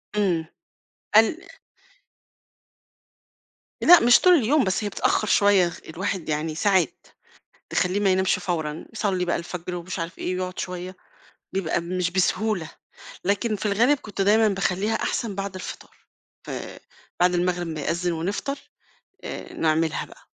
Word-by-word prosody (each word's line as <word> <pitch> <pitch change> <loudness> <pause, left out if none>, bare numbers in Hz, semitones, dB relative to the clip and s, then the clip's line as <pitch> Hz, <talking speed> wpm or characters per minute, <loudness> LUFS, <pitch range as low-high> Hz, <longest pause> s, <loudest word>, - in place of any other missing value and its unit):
إمم. 180 -6 +1 0.7
ال 225 +8 +5 2.4
لأ 355 -1 +9
مش 240 +1 +6
طول 365 - +6
اليوم، 285 -1 +3
بس 190 +2 0
هي 205 - -1
بتأخّر 215 +1 0
شوية، 200 -4 +4 0.2
الواحد 180 0 -3
يعني 155 +1 -2
ساعات 185 -3 +1 0.6
تخلّيه 180 +3 +1
ما 200 - +2
ينامش 190 0 +2
فورًا، 160 -4 -3
يصلّي 195 -4 -1
بقى 175 - 0
الفجر 175 +1 -5
ومش 175 +1 -5
عارف 165 +2 -5
إيه 180 - -2
ويقعُد 185 0 -4
شوية، 180 +1 -5 0.6
بيبقى 175 -3 0
مش 180 +1 -2
بسهولة، 190 -1 0 0.5
لكن 205 +3 0
في 205 - -4
الغالِب 235 +8 +3
كنت 205 -5 -8
دايمًا 215 +2 +4
باخلّيها 195 +2 0
أحسن 220 -1 -2
بعد 195 0 -4
الفطار، 185 - -8 0.5
فبعد 180 0 -3
المغرب 175 0 0
ما 160 -2 -4
يأذّن 170 +4 -1
ونفطر 200 - -3 0.7
آآ، - - -7
نعملها 160 0 0
بقى. - - -17
185 Hz, 135 wpm, -24 LUFS, 175-205 Hz, 2.4 s, لأ